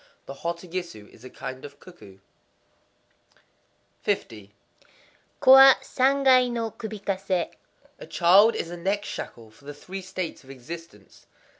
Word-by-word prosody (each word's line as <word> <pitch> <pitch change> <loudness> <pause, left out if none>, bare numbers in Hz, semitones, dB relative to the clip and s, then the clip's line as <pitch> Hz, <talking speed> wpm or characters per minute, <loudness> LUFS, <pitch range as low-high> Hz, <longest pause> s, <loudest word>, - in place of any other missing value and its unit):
—The - - -8
hototogisu 170 - -6
is 110 - -19
a 130 - -10
kind 130 0 -8
of 145 0 -12
cuckoo. 140 - -15 1.9
50.—Ko 105 - -4
wa 270 0 +10
Sangai 260 -1 +3
no 230 -2 -3
kubikase. 195 -5 -3 0.5
A - - -10
child 195 +6 +5
is 170 - -4
a 175 - -7
neck 200 +4 -2
shackle 115 -2 -8
for 125 +6 -22
the 145 0 -8
Three 190 +6 -8
States 185 -4 -6
of 135 - -19
Existence. 135 -4 -12
175 Hz, 125 wpm, -25 LUFS, 135-205 Hz, 1.9 s, wa